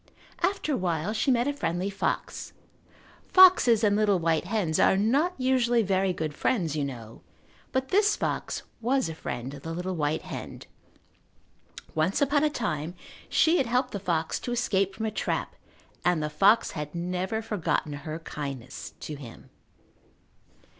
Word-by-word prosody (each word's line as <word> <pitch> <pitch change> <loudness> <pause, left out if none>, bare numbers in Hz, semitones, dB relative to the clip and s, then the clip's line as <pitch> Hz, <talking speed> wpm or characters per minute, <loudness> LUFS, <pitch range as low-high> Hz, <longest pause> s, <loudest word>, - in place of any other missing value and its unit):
After 355 -4 0
a - - +1
while 175 +1 -1
she 225 +5 0
met 245 0 +3
a 285 - 0
friendly 180 -6 -2
fox. 200 - -3 0.7
Foxes 355 - +7
and 205 -1 +4
little 205 -2 +3
white 165 -1 +1
hens 180 -5 0
are 190 - +5
not 280 - +2
usually 250 -3 +2
very 190 -1 +1
good 160 -4 -3
friends, 165 - 0
you 150 - 0
know, 115 -5 -7 0.5
but 260 0 -1
this 415 +2 +3
fox - - -3 0.2
was 260 +3 +1
a - - -4
friend 125 -3 -5
of 140 - -9
the 165 - -6
little 180 +1 -3
white 155 0 -1
hen. - - -7 1.3
Once 160 - +1
upon 285 0 +2
a 305 - +4
time 175 - -3 0.3
she 330 +2 +4
had 270 -6 +1
helped 250 +2 +1
the 200 - -4
fox 165 -4 -1
to 245 - -5
escape 195 -5 0
from 220 - -3
a 220 - -1
trap - - -2 0.5
and 175 -3 +2
the 150 - -2
fox 205 +8 +4
had 150 +1 -6
never 180 +5 -2
forgotten 185 -8 -1
her 155 +2 -5
kindness 140 -6 -7
to 155 - -5
him. 135 -5 -11
190 Hz, 160 wpm, -27 LUFS, 160-245 Hz, 1.3 s, Foxes